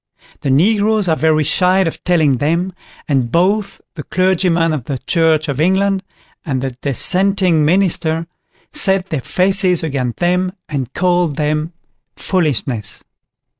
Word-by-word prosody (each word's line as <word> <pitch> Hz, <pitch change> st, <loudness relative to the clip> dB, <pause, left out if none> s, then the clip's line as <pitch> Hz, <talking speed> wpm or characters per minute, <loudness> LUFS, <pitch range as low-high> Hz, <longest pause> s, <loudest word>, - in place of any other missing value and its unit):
The 140 Hz, -, -3 dB
Negroes 205 Hz, +7 st, +2 dB
are 160 Hz, -, +2 dB
very 155 Hz, -1 st, +2 dB
shy 180 Hz, +5 st, +3 dB
of 165 Hz, -4 st, -3 dB
telling 155 Hz, -7 st, +2 dB
them, 170 Hz, +7 st, 0 dB, 0.4 s
and 130 Hz, -5 st, 0 dB
both 195 Hz, +5 st, 0 dB
the 155 Hz, -, -7 dB
clergyman 175 Hz, -1 st, +1 dB
of 140 Hz, -6 st, -4 dB
the 135 Hz, 0 st, -3 dB
Church 160 Hz, +2 st, +1 dB
of 140 Hz, 0 st, -2 dB
England, 190 Hz, +3 st, +1 dB, 0.4 s
and 135 Hz, -5 st, -2 dB
the 135 Hz, +1 st, -3 dB
Dissenting 180 Hz, +6 st, +1 dB
Minister 165 Hz, -1 st, +1 dB, 0.5 s
set 190 Hz, -1 st, +1 dB
their 155 Hz, -4 st, -1 dB
faces 185 Hz, +1 st, +1 dB
against 135 Hz, -6 st, -2 dB
them, 180 Hz, +1 st, 0 dB
and 135 Hz, -4 st, -4 dB
call 180 Hz, -1 st, +2 dB
them 150 Hz, +2 st, -2 dB, 0.4 s
foolishness. 130 Hz, -, -2 dB
165 Hz, 130 wpm, -16 LUFS, 150-185 Hz, 0.5 s, shy